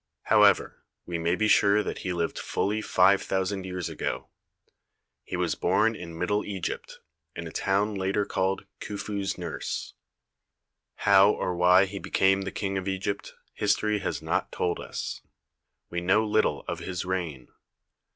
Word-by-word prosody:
However, - - +4 0.2
we 85 -1 -3
may 85 +2 +1
be 110 +3 +1
sure 105 0 +4
that - - -4
he 95 - -3
lived 85 -2 -2
fully 105 +2 -1
five 95 -1 +4
thousand 95 0 -2
years 90 -3 -3
ago. - - -4 0.9
He - - -5
was - - 0
born 110 +5 +2
in 85 -4 -8
Middle 105 +4 0
Egypt, 95 -4 -5 0.4
in 85 - -5
a 80 - -7
town 100 +4 +1
later 100 +1 0
called 95 0 -1
"Khufu's 100 -1 -3
Nurse." 85 -3 -4 1.0
How 100 0 +6
or 90 -3 -1
why 90 +2 +6
he 100 +1 -6
became 95 +1 +2
the 95 0 -4
King 95 -1 -2
of 95 - -7
Egypt, 95 +1 -3 0.2
history 105 +1 +1
has - - -3
not - - -1
told 90 -1 -1
us. - - -5 0.7
We 85 0 -2
know 100 +5 +3
little 110 0 +1
of - - -3
his 90 -1 -4
reign. 85 -9 -3
95 Hz, 150 wpm, -27 LUFS, 90-100 Hz, 1.0 s, How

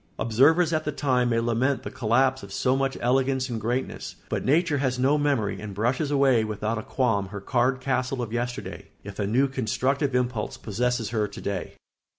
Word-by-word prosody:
Observers 150 +10 +3
at 155 0 +1
the 150 - -2
time 125 -4 +1
may 115 -1 +2
lament 120 +4 0
the - - -6
collapse 130 +2 +2
of 100 - -11
so 130 +6 +1
much 135 0 -1
elegance 130 +1 +1
and 115 -2 -3
greatness; 120 +4 -3
but - - -2
nature 155 +1 +2
has 130 -2 0
no 135 +4 +3
memory 125 -10 0
and 105 -2 -7
brushes 125 +8 0
away 135 -5 +3
without 110 +1 -2
a - - -4
qualm 110 -6 0
her 100 +1 -7
card 125 +5 +1
castle 130 0 -1
of 115 -1 -6
yesterday, 120 0 -4 0.2
if 100 0 -9
a 100 - 0
new 130 +6 +3
constructive 135 +2 -1
impulse 125 -3 -1
possesses 120 +1 -1
her 110 -2 0
to 100 - -10
day. 100 -3 -4
125 Hz, 190 wpm, -25 LUFS, 110-135 Hz, 0.2 s, Observers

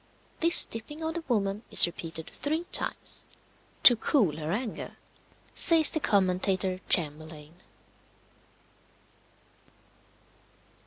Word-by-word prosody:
This 335 +1 +6
dipping 295 +8 -9
of 320 0 -4
the 340 0 -6
woman 205 -4 -2
is - - +9
repeated 165 -2 -8
three 315 +3 -4
times, - - -2 0.6
"to 245 - +8
cool 215 - -1
her 155 0 -6
anger," 220 +3 -6 0.6
says 325 -3 +2
the 315 - -2
commentator, 185 -3 -1
Chamberlayne. 155 +1 -3
195 Hz, 95 wpm, -26 LUFS, -, 0.6 s, is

